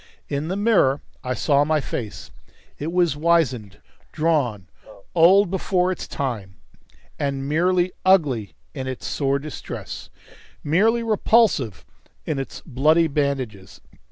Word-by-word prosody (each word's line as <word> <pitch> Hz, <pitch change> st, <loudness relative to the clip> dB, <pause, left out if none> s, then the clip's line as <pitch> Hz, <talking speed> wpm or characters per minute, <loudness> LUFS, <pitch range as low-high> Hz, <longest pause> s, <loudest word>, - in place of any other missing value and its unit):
In 145 Hz, +2 st, -2 dB
the 185 Hz, -, -2 dB
mirror 200 Hz, -10 st, +3 dB, 0.2 s
I 125 Hz, 0 st, -2 dB
saw 145 Hz, +1 st, +3 dB
my 155 Hz, +1 st, +1 dB
face; 115 Hz, -6 st, -6 dB, 0.5 s
it 155 Hz, +3 st, -3 dB
was 175 Hz, -4 st, +2 dB
wizened, 140 Hz, -, +1 dB, 0.3 s
drawn, 145 Hz, -, 0 dB, 0.5 s
old 185 Hz, +3 st, +5 dB
before 185 Hz, -1 st, +1 dB
its 185 Hz, -, -5 dB
time, 110 Hz, -9 st, -4 dB, 0.6 s
and 140 Hz, -2 st, -2 dB
merely 175 Hz, +4 st, +2 dB
ugly 145 Hz, -, +2 dB, 0.2 s
in 130 Hz, -, -5 dB
its 130 Hz, -1 st, -5 dB
sore 140 Hz, -1 st, 0 dB
distress, 140 Hz, -, -7 dB, 0.5 s
merely 220 Hz, +10 st, +2 dB
repulsive 215 Hz, -, +2 dB, 0.4 s
in 135 Hz, -, -2 dB
its 135 Hz, -, -7 dB
bloody 155 Hz, +4 st, +3 dB
bandages. 130 Hz, -, -3 dB
150 Hz, 120 wpm, -22 LUFS, 130-175 Hz, 0.6 s, old